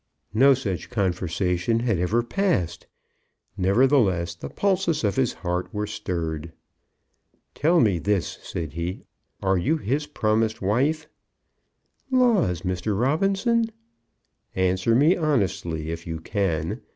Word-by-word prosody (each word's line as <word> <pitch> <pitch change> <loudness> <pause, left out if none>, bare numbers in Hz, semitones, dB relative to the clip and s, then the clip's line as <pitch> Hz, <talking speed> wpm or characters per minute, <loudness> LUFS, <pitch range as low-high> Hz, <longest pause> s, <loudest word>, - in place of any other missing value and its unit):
No 135 +5 +6
such 100 -9 -4
conversation 90 +2 0
had 115 -7 0
ever 105 +7 +1
passed. 120 - -1 0.7
Nevertheless, 95 -4 +2
the 85 - -8
pulses 190 -6 0
of 100 -2 +1
his 130 -3 +2
heart 90 0 -3
were 105 -1 -2
stirred. 85 -6 -4 1.0
"Tell 165 +4 +3
me 100 - +3
this," 100 0 -1
said 80 -3 -5
he. 85 +3 -4 0.4
"Are 95 -1 +2
you 155 - +1
his 145 +3 -2
promised 110 -5 0
wife?" 140 +11 0 1.0
"Laws, 225 - +2
Mr. 95 +2 -1
Robinson!" 195 - +2 0.9
"Answer 95 +4 +2
me 150 +8 +5
honestly, 95 - -1
if 85 +1 -6
you 80 -1 -4
can. 85 -1 -2
105 Hz, 115 wpm, -24 LUFS, 90-140 Hz, 1.0 s, No